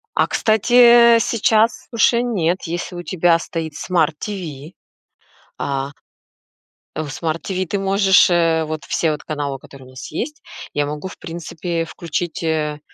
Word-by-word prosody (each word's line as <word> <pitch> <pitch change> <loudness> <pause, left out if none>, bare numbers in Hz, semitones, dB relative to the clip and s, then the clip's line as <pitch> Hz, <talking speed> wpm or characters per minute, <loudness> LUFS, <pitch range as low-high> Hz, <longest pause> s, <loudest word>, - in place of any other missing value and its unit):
А - - +3
кстати, 235 +2 +5
э, - - +4
сейчас 225 0 +1
уже 235 0 +3
нет, 185 -7 -1
если 175 +2 -4
у 175 - -5
тебя 175 -2 +2
стоит 165 -2 -5
Smart 160 0 0
TV, 170 -6 -6 0.9
а 140 0 -3 1.0
в 155 -1 -3
Smart 160 +2 -3
TV 185 -1 -2
ты 200 +4 -2
можешь, 195 0 +4
э, 165 -2 +2
вот 155 0 -5
все 160 - 0
вот 150 - -5
каналы, 145 -3 -3
которые 135 -1 -14
у - - -15
нас 130 - -9
есть, 300 - -5 0.3
я 145 0 0
могу, 150 +5 -5
в - - -11
принципе, 165 0 -4
включить, 170 +1 -4
э, 155 -2 -1
170 Hz, 155 wpm, -20 LUFS, 155-195 Hz, 1.0 s, кстати